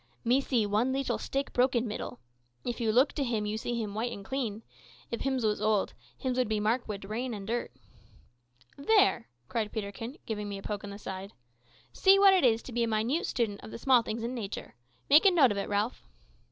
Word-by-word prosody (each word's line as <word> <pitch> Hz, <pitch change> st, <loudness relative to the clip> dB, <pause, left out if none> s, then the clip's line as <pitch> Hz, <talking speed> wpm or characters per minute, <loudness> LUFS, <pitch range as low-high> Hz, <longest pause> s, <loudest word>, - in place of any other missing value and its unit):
"Me 250 Hz, +4 st, +4 dB
see 245 Hz, -5 st, +1 dB
one 215 Hz, +5 st, +1 dB
leetle 270 Hz, 0 st, -1 dB
stick 275 Hz, +1 st, -3 dB
brok 255 Hz, +1 st, +3 dB
in 240 Hz, +1 st, +2 dB
middel. 210 Hz, -, -5 dB, 0.5 s
If 240 Hz, 0 st, -3 dB
you 225 Hz, -2 st, +2 dB
look 255 Hz, +6 st, +4 dB
to 285 Hz, -, -1 dB
him 225 Hz, -4 st, -1 dB
you 210 Hz, +1 st, -2 dB
see 235 Hz, +2 st, -3 dB
him 210 Hz, -3 st, -3 dB
white 230 Hz, +3 st, -2 dB
and 200 Hz, -3 st, -8 dB
clean. 230 Hz, -5 st, -3 dB, 0.5 s
If 235 Hz, -, -3 dB
hims 265 Hz, -3 st, 0 dB
was 210 Hz, -1 st, 0 dB
old, 215 Hz, -2 st, +1 dB, 0.2 s
hims 255 Hz, -1 st, -1 dB
would 255 Hz, -, +2 dB
be 215 Hz, -1 st, 0 dB
mark 225 Hz, +4 st, 0 dB
wid 200 Hz, -2 st, -5 dB
rain 230 Hz, +4 st, -3 dB
and 200 Hz, -1 st, -7 dB
dirt." 235 Hz, +3 st, -2 dB, 1.1 s
"There!" 390 Hz, -, +3 dB, 0.2 s
cried 215 Hz, -, -2 dB
Peterkin, 220 Hz, +6 st, -5 dB
giving 210 Hz, -2 st, -4 dB
me 200 Hz, -, -4 dB
a 195 Hz, -, -10 dB
poke 210 Hz, -1 st, -4 dB
in 205 Hz, -, -6 dB
the 200 Hz, -, -7 dB
side, 195 Hz, -1 st, -7 dB, 0.6 s
"see 385 Hz, +1 st, +6 dB
what 395 Hz, -1 st, +7 dB
it 370 Hz, -, +3 dB
is 230 Hz, -2 st, +3 dB
to -, -, -9 dB
be 240 Hz, 0 st, -1 dB
a -, -, +1 dB
minute 225 Hz, +9 st, 0 dB
student 220 Hz, -5 st, -1 dB
of -, -, -10 dB
the -, -, -7 dB
small 255 Hz, 0 st, +4 dB
things 225 Hz, 0 st, -4 dB
in 240 Hz, +2 st, -3 dB
nature. 215 Hz, -5 st, -6 dB, 0.3 s
Make 295 Hz, +3 st, +7 dB
a -, -, +9 dB
note 305 Hz, -, +5 dB
of 205 Hz, -, -2 dB
it, -, -, -3 dB
Ralph." 210 Hz, +4 st, -1 dB
230 Hz, 225 wpm, -30 LUFS, 210-255 Hz, 1.1 s, a